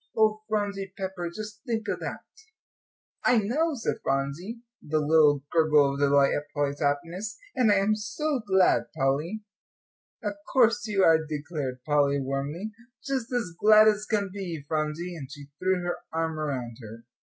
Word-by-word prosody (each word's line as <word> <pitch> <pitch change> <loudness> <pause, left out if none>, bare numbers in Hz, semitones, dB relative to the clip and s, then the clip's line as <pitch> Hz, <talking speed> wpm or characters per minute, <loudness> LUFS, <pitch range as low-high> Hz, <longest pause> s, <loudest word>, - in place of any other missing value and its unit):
Oh, 215 -1 +3
Phronsie 200 -2 -2
Pepper, 185 -3 -4
just 210 +3 -8
think 225 -4 -3
of - - -2
that." - - -5 1.0
"I 245 - +4
know," 285 +10 +1
said 230 - -2
Phronsie, 140 - -2 0.2
with 150 - -13
a - - +5
little 150 -2 +4
gurgle 150 -4 +4
of 140 - -5
delight 140 -1 +4
at 145 0 -3
Polly's 145 -1 -1
happiness, 170 +8 -2 0.2
"and 245 -5 +4
I - - +5
am 200 +2 +2
so 255 +8 -2
glad, 190 -4 +3
Polly." 150 +10 0 0.8
"Of 205 -1 -1 0.2
course 230 -3 +3
you 200 -2 +2
are," 160 -2 +5
declared 150 -4 -5
Polly, 140 0 +2
warmly, 140 +9 -3 0.3
"just 265 -3 -2
as 240 -7 -1
glad 215 +5 +6
as 210 -1 +2
can 205 -3 0
be, 175 -7 -5
Phronsie," 155 +3 -2
and 140 -4 -8
she 145 -2 -11
threw 185 -1 +1
her 175 0 -2
arm 160 -1 -2
around 130 -6 -3
her. 115 +1 -10
175 Hz, 165 wpm, -27 LUFS, 145-215 Hz, 1.0 s, glad